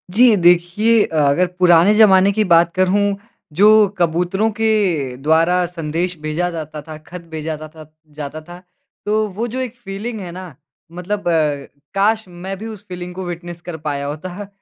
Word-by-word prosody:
जी 240 Hz, -1 st, +6 dB
देखिए 180 Hz, +5 st, +3 dB
अ, -, -, -8 dB
अगर 150 Hz, +5 st, +3 dB
पुराने 175 Hz, +2 st, +5 dB
ज़माने 200 Hz, -3 st, +5 dB
की 215 Hz, -, +1 dB
बात 170 Hz, 0 st, +5 dB
करूँ 200 Hz, +2 st, +2 dB, 0.4 s
जो 195 Hz, +7 st, +5 dB, 0.3 s
कबूतरों 180 Hz, +5 st, +1 dB
के 225 Hz, 0 st, +2 dB, 0.5 s
द्वारा, 165 Hz, +5 st, +2 dB
संदेश 170 Hz, +1 st, -3 dB
भेजा 155 Hz, +4 st, -2 dB
जाता 155 Hz, -2 st, -6 dB
था, 155 Hz, +1 st, -10 dB
ख़त 170 Hz, +3 st, -11 dB
भेजा 160 Hz, 0 st, -4 dB
था-था 155 Hz, +1 st, -11 dB, 0.3 s
जाता 150 Hz, +2 st, -6 dB
था। 175 Hz, 0 st, -10 dB, 0.5 s
तो 215 Hz, +1 st, +1 dB
वो 230 Hz, +4 st, -2 dB
जो -, -, -2 dB
एक 255 Hz, -2 st, -4 dB
फ़ीलिंग 210 Hz, +4 st, -5 dB
है 180 Hz, -3 st, -7 dB
ना 185 Hz, +2 st, -8 dB, 0.5 s
मतलब 180 Hz, +3 st, -4 dB
अ, 150 Hz, -4 st, 0 dB, 0.3 s
काश! 215 Hz, +3 st, +2 dB
मैं 185 Hz, +2 st, -7 dB
भी 215 Hz, -, -8 dB
उस 215 Hz, -2 st, -10 dB
फ़ीलिंग 180 Hz, 0 st, -7 dB
को 190 Hz, 0 st, -5 dB
विटनेस 175 Hz, 0 st, -7 dB
कर 175 Hz, -2 st, -7 dB
पाया 140 Hz, -1 st, -2 dB
होता। 180 Hz, +7 st, -6 dB
180 Hz, 170 wpm, -18 LUFS, 160-200 Hz, 0.5 s, जी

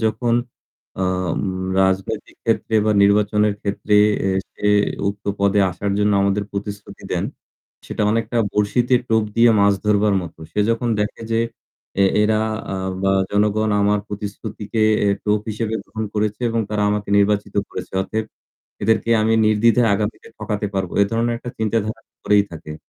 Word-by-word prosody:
যখন 115 Hz, +2 st, +1 dB, 0.6 s
অ -, -, -2 dB, 0.3 s
উম -, -, -2 dB, 0.4 s
রাজনৈতিক 95 Hz, +3 st, -1 dB
ক্ষেত্রে 115 Hz, 0 st, 0 dB
বা 110 Hz, -, +4 dB
নির্বাচনের 105 Hz, +1 st, +3 dB
ক্ষেত্রে 105 Hz, +1 st, -1 dB, 0.3 s
এ -, -, +2 dB, 0.3 s
সে -, -, -3 dB, 0.4 s
উক্ত 100 Hz, +1 st, -6 dB
পদে 100 Hz, 0 st, +3 dB
আসার 100 Hz, +3 st, -3 dB
জন্য 105 Hz, 0 st, +2 dB
আমাদের 100 Hz, +1 st, +1 dB
প্রতিশ্রুতি 100 Hz, 0 st, -7 dB
দেন, -, -, 0 dB, 0.6 s
সেটা 105 Hz, -, -2 dB
অনেকটা 115 Hz, +1 st, -1 dB
বড়শিতে 120 Hz, +5 st, +2 dB
টোপ 110 Hz, -1 st, +3 dB
দিয়ে 115 Hz, +1 st, +6 dB
মাছ 100 Hz, 0 st, +5 dB
ধরবার 105 Hz, 0 st, +3 dB
মতো। 85 Hz, -2 st, -10 dB
সে -, -, -1 dB
যখন 115 Hz, +1 st, 0 dB
দেখে 105 Hz, +2 st, -2 dB
যে 115 Hz, -, +2 dB, 0.6 s
এ -, -, +6 dB, 0.2 s
এরা 105 Hz, 0 st, +3 dB, 0.4 s
আ -, -, -2 dB, 0.3 s
বা 95 Hz, -, +2 dB, 0.2 s
জনগণ 105 Hz, +1 st, +1 dB
আমার 105 Hz, 0 st, +2 dB
প্রতিশ্রুতিকে 105 Hz, +1 st, -5 dB, 0.2 s
এ -, -, +3 dB, 0.2 s
টোপ 105 Hz, 0 st, +2 dB
হিসেবে 110 Hz, +1 st, -3 dB
গ্রহণ 110 Hz, 0 st, -5 dB
করেছে 105 Hz, +1 st, -1 dB
এবং 115 Hz, 0 st, 0 dB
তারা 105 Hz, -1 st, 0 dB
আমাকে 105 Hz, -1 st, -2 dB
নির্বাচিত 100 Hz, 0 st, +1 dB
করেছে। -, -, -7 dB
অতএব 110 Hz, +3 st, -3 dB, 0.6 s
এদেরকে 110 Hz, +2 st, +1 dB
আমি 110 Hz, +1 st, +2 dB
নির্দ্বিধায় 115 Hz, +2 st, +3 dB
আগামীতে 105 Hz, +2 st, -3 dB
ঠকাতে 105 Hz, -1 st, -3 dB
পারবো। 95 Hz, -2 st, -2 dB
এ -, -, +7 dB
ধরনের 115 Hz, +1 st, 0 dB
একটা 120 Hz, -, -7 dB
চিন্তাধারা 110 Hz, 0 st, -1 dB, 0.2 s
করেই 105 Hz, -1 st, +4 dB
থাকে। 75 Hz, -2 st, -8 dB
105 Hz, 155 wpm, -20 LUFS, 100-110 Hz, 0.6 s, এ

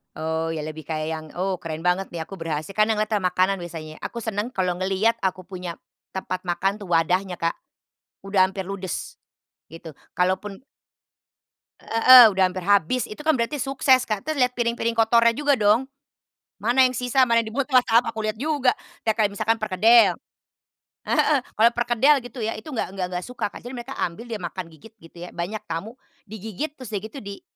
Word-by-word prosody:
Oh 160 Hz, +1 st, -2 dB
iya, 155 Hz, -, -4 dB
lebih 155 Hz, 0 st, -7 dB
kayak 155 Hz, -1 st, -3 dB
yang, 160 Hz, -1 st, -5 dB
"Oh, 185 Hz, +1 st, -2 dB
keren 160 Hz, -2 st, -6 dB
banget 180 Hz, +2 st, 0 dB
nih, 170 Hz, -, -4 dB
aku 190 Hz, +4 st, -8 dB
berhasil," 160 Hz, 0 st, -4 dB
kan, 215 Hz, -, +5 dB
yang 215 Hz, -1 st, 0 dB
lihat 215 Hz, -, -1 dB
ke 215 Hz, -, +1 dB
makanan 185 Hz, 0 st, +1 dB
biasanya, 160 Hz, -3 st, -8 dB
aku 235 Hz, -, -6 dB
senang 220 Hz, +3 st, -3 dB
kalau 180 Hz, -2 st, -1 dB
ngelihat 195 Hz, +5 st, +1 dB
aku 185 Hz, 0 st, -1 dB
punya 180 Hz, -1 st, -7 dB, 0.4 s
tempat 185 Hz, -1 st, -4 dB
makan 180 Hz, +3 st, 0 dB
tuh, 205 Hz, -, -9 dB
wadahnya, 180 Hz, +3 st, +1 dB
Kak, 170 Hz, -1 st, -2 dB, 0.7 s
udah 195 Hz, -1 st, +3 dB
hampir 190 Hz, 0 st, -5 dB
ludes, 185 Hz, -2 st, -6 dB, 0.5 s
gitu. 165 Hz, 0 st, -10 dB, 0.2 s
Kalaupun 190 Hz, +4 st, -1 dB, 1.2 s
Heeh, 240 Hz, +1 st, +8 dB
udah 190 Hz, -2 st, +1 dB
hampir 185 Hz, 0 st, -6 dB
habis, 200 Hz, +5 st, +2 dB
itu 210 Hz, -, -8 dB
kan 315 Hz, -, +4 dB
berarti 245 Hz, +2 st, -1 dB
sukses, 265 Hz, -1 st, +2 dB
Kak, 215 Hz, -2 st, -2 dB
terus 310 Hz, +5 st, -4 dB
liat 250 Hz, -2 st, +2 dB
piring-piring 235 Hz, -1 st, -1 dB
kotornya 230 Hz, +1 st, +4 dB
juga 285 Hz, +2 st, +1 dB
dong. 220 Hz, +5 st, +3 dB, 0.7 s
Mana 250 Hz, +3 st, +2 dB
yang 255 Hz, -, -5 dB
sisa, 250 Hz, +1 st, +2 dB
mana 230 Hz, 0 st, +3 dB
yang 220 Hz, -, -7 dB
di -, -, -13 dB
mulut, 275 Hz, +1 st, -1 dB
wah, 255 Hz, -2 st, +5 dB
tahap, 230 Hz, +2 st, +3 dB
aku 220 Hz, -1 st, -5 dB
liat 215 Hz, 0 st, -2 dB
juga. 285 Hz, -3 st, +2 dB, 0.3 s
Ya, 220 Hz, -, +4 dB
kayak 215 Hz, -2 st, +1 dB
misalkan 220 Hz, +2 st, 0 dB
perkedel 220 Hz, +3 st, +5 dB, 0.9 s
heeh, 295 Hz, -3 st, +3 dB, 0.2 s
kalau 225 Hz, +2 st, +6 dB
perkedel, 240 Hz, +4 st, +3 dB
gitu 245 Hz, -1 st, -7 dB
ya, 225 Hz, -, -1 dB
itu 220 Hz, -, -9 dB
nggak 250 Hz, -9 st, -3 dB
nggak 190 Hz, -2 st, -3 dB
nggak 180 Hz, 0 st, -4 dB
suka 250 Hz, -4 st, -4 dB
Kak, -, -, -13 dB
jadi 245 Hz, -, -7 dB
mereka 255 Hz, +1 st, -7 dB
ambil, 210 Hz, +8 st, -4 dB
dia 230 Hz, -, -3 dB
makan, 180 Hz, -2 st, -6 dB
gigit 165 Hz, +8 st, -16 dB
gitu 165 Hz, +1 st, -17 dB
ya, 180 Hz, -, -10 dB
banyak 185 Hz, +5 st, -4 dB
tamu, 170 Hz, +9 st, -6 dB, 0.3 s
digigit, 220 Hz, -, -5 dB
terus 255 Hz, -5 st, -10 dB
dah 205 Hz, -, -1 dB
gitu 220 Hz, +6 st, -10 dB
di 200 Hz, 0 st, -8 dB
210 Hz, 195 wpm, -23 LUFS, 180-235 Hz, 1.2 s, Heeh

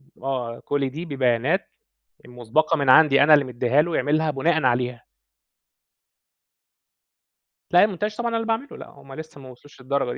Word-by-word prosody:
ب -, -, -22 dB
آه، 125 Hz, -4 st, -4 dB
كل 140 Hz, -2 st, -1 dB
دي 155 Hz, +6 st, -8 dB
ببيانات 135 Hz, +3 st, -1 dB, 0.6 s
مُسبَقة 125 Hz, +7 st, -1 dB
من 140 Hz, -3 st, +1 dB
عندي 140 Hz, 0 st, +6 dB
أنا 155 Hz, +1 st, +6 dB
اللي 145 Hz, -, +3 dB
مدّيها 125 Hz, +2 st, 0 dB
له 170 Hz, 0 st, -3 dB
يعملها 155 Hz, +1 st, 0 dB
بُناءً 160 Hz, +2 st, 0 dB
عليها. 125 Hz, -1 st, -1 dB, 2.7 s
لأ، 180 Hz, +3 st, +6 dB
الmontage 210 Hz, +2 st, -5 dB
طبعًا 235 Hz, 0 st, -2 dB
أنا 230 Hz, -, -2 dB
اللي 225 Hz, 0 st, -4 dB
باعمله، 230 Hz, +5 st, -3 dB
لأ -, -, -11 dB
هُم 135 Hz, -, -15 dB
لسّه 155 Hz, -1 st, -11 dB
ما 130 Hz, -, -12 dB
وصلوش 130 Hz, +2 st, -17 dB
للدرجة 130 Hz, -1 st, -2 dB
140 Hz, 160 wpm, -22 LUFS, 125-160 Hz, 2.7 s, عندي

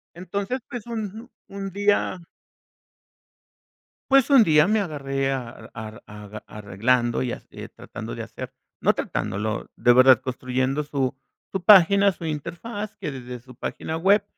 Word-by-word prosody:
entonces, 200 Hz, +7 st, -3 dB
pues, 240 Hz, -3 st, -7 dB
un 225 Hz, +1 st, -5 dB, 0.2 s
un 195 Hz, 0 st, -5 dB
día 205 Hz, -1 st, +1 dB, 1.9 s
pues 275 Hz, -2 st, +5 dB
un 270 Hz, -5 st, +8 dB
día 150 Hz, -3 st, +5 dB
me 215 Hz, +2 st, +2 dB
agarré 135 Hz, -6 st, -2 dB
a 125 Hz, -3 st, -6 dB
a 110 Hz, -1 st, -8 dB
a 105 Hz, 0 st, -10 dB
arreglando, 115 Hz, +4 st, 0 dB
y 125 Hz, -2 st, -2 dB, 0.4 s
tratando -, -, -8 dB
de -, -, -5 dB
hacer, -, -, -8 dB, 0.3 s
no -, -, +5 dB
tratándolo, 110 Hz, +2 st, -3 dB
de 120 Hz, -, +5 dB
verdad 130 Hz, -1 st, +7 dB
construyendo 130 Hz, +3 st, -1 dB
su 140 Hz, -2 st, -1 dB, 0.4 s
su 190 Hz, -2 st, -2 dB
página, 200 Hz, 0 st, +7 dB
su 170 Hz, -, -11 dB
interfaz, 175 Hz, +8 st, -5 dB
que 150 Hz, -, -5 dB
desde 125 Hz, -1 st, -7 dB
su 125 Hz, +2 st, -15 dB
página 160 Hz, +6 st, -4 dB
web, 200 Hz, +5 st, +4 dB
150 Hz, 140 wpm, -24 LUFS, 125-200 Hz, 1.9 s, un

